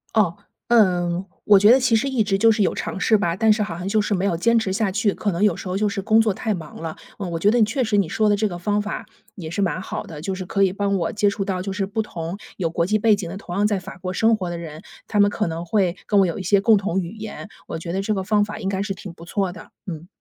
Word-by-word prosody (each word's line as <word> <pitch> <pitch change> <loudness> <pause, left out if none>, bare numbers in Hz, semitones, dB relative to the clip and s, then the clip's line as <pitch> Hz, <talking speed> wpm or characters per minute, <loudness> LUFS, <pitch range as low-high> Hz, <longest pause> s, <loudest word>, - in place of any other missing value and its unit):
哦， 195 -6 +3 0.3
嗯， 180 -5 +3 0.2
我 205 - +7
觉 205 +3 +6
得 260 - +6
其 250 -3 +3
实 225 +5 +1
一 255 -4 +1
直 205 -2 +1
就 225 +2 +5
是 215 -1 +2
有 - - 0
尝 - - -4
试 220 - +4
吧， 175 -5 0
但 220 +2 +3
是 210 0 0
好 170 -5 -5
像 180 +2 -5
就 215 +2 +2
是 210 - -1
没 190 0 0
有 180 -4 +1
坚 230 +6 +3
持 190 -3 -2
下 210 -1 0
去， 205 +1 +1
可 205 - -2
能 170 +1 -3
有 205 -5 +4
时 185 - -7
候 185 - -1
就 210 +1 +1
是 200 -1 -2
工 220 +3 +4
作 220 -2 +3
太 220 +3 -2
忙 165 -5 -8
了。 160 -1 -5 0.2
嗯， 185 -4 -4
我 165 - -2
觉 200 +5 +4
得 240 - +3
你 - - +6
确 225 +5 0
实 220 -4 +1
你 195 -6 +2
说 215 +3 +1
的 205 - +4
这 210 0 0
个 175 - -6
方 205 +3 0
法 210 - -5 0.3
也 165 -5 -7
是 200 +4 -2
蛮 185 -1 0
好 - - -5
的， 160 -3 -9
就 190 +3 -3
是 185 - -6
可 195 +2 +1
以 190 -1 +2
帮 200 -1 0
我 170 - -2
接 205 0 +2
触 200 0 -3
到 185 -2 -2
就 195 - -4
是 195 0 -1
不 205 +3 -2
同 170 -3 -5 0.2
有 170 -4 -1
国 170 +1 0
际 215 +3 +1
背 220 0 +4
景 195 -4 -5
的， 190 - -6
同 175 -3 -7
样 205 +2 +2
在 210 -2 +1
法 185 0 -10
国 185 0 -4
生 225 +4 +3
活 185 -4 -4
的 175 - -4
人， 160 -2 -8 0.3
他 210 - +2
们 205 - +5
可 215 -2 -1
能 165 +1 -4
会 185 -1 +1
跟 205 - +3
我 195 - +5
有 170 - -2
一 190 - -5
些 200 +2 +3
共 220 +2 +5
同 195 -2 0
语 180 +4 -5
言。 215 -1 -7 0.2
我 - - -4
觉 170 +1 -5
得 190 - 0
这 215 +2 -1
个 195 - -1
方 210 +1 +2
法 210 +1 -5
应 190 - -4
该 195 0 -1
是 200 -1 -3
挺 190 -2 -9
不 170 - -14
错 190 +1 -2
的， 170 - -12 0.2
嗯。 170 -2 -7
195 Hz, 340 characters per minute, -22 LUFS, 180-210 Hz, 0.3 s, 我